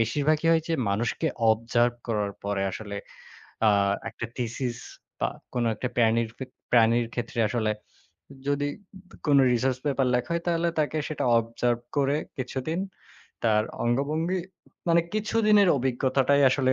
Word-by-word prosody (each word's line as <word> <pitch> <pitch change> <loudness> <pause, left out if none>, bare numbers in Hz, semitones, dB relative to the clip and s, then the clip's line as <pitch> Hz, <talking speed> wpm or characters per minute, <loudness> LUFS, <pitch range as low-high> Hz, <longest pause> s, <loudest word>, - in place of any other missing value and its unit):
বেশিরভাগই 150 +7 +1
হয় 165 -1 +4
যে 165 - +1 0.2
মানুষকে 120 +10 -1 0.2
observe 120 +2 +2
করার 105 -3 -1
পরে 100 -1 -1
আসলে 100 0 -6 0.7
আ - - +7 0.4
একটা 115 - -6
থিসিস 120 0 -3 0.4
বা - - +2 0.3
কোনো 120 -1 +1
একটা 125 - -3
প্রানীর 115 -1 +3
ফিক 130 - -7 0.2
প্রাণীর 115 0 +4
ক্ষেত্রে 120 0 -4
আসলে 110 -1 0 0.8
যদি 145 0 +1 0.6
কোন 145 -1 +5 0.2
রিসার্চ 130 +1 +1
পেপার 135 -2 +1
লেখা 125 +5 -1
হয় 170 0 -1
তাহলে 170 0 +1
তাকে 155 +1 +1
সেটা 155 - -3
observe 115 +1 -1 0.2
করে 140 0 +2 0.2
কিছুদিন 130 +5 -3 0.7
তার 110 -1 +4 0.2
অঙ্গভঙ্গি 155 +9 0 0.5
মানে 170 0 +5
কিছুদিনের 215 -2 +3
অভিজ্ঞতাটাই 135 +2 +2
আসলে 130 -1 +2
130 Hz, 135 wpm, -26 LUFS, 115-150 Hz, 0.8 s, আ